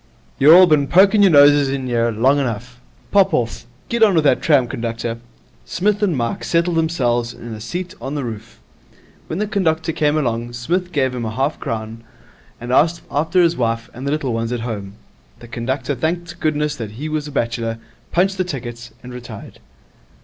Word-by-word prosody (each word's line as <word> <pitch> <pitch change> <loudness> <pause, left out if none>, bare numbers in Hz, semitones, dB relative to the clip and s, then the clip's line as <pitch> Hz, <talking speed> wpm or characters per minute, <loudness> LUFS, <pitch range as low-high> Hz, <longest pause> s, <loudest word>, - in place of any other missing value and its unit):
You're 150 +5 +8
all 185 +1 +9
bin 150 -5 +2
poking 195 +6 +5
your 200 - +6
noses 145 -1 +6
in 135 -1 -3
'ere 115 -1 +1
long 130 +6 +2
enough. 125 -1 -4 0.3
Pop 195 -1 +4
off. 115 0 -3 0.2
Get 235 0 -2
on 210 -4 +5
with 160 - +3
that 140 -4 +3
tram, 140 -6 +3
conductor.' 115 0 -4 0.4
Psmith 205 +3 -1
and 185 -8 +1
Mike 115 -1 -2
settled 170 0 +1
themselves 120 -8 0
in 115 -1 -9
a 110 - -8
seat 180 - -5
on 135 +2 -5
the 145 - -2
roof. 115 -1 -8 0.7
When 160 - -4
the 210 - 0
conductor 165 -6 0
came 150 -1 +1
along, 120 -4 -2
Psmith 175 +10 -2
gave 130 -5 0
him 120 -2 -4
half 130 +7 -1
a - - -26
crown, 115 0 -5 0.6
and 120 +1 -6
asked 165 +5 +2
after 165 +5 +2
his 170 0 +2
wife 115 -3 -2
and 130 +4 -7
the - - 0
little 145 -5 -1
ones 115 +1 -2
at 120 -2 -2
home. 105 -4 -5 0.4
The 120 - -13
conductor 130 +4 -3
thanked 170 +6 -3
goodness 150 -1 0
that 110 -3 -6
he 140 +8 -6
was 155 -1 -3
a - - -8
bachelor, 115 -3 -2 0.3
punched 190 +2 +1
the - - +3
tickets, 120 -7 -7
and 125 0 -9
retired. 120 -4 -10
135 Hz, 195 wpm, -19 LUFS, 115-165 Hz, 0.7 s, all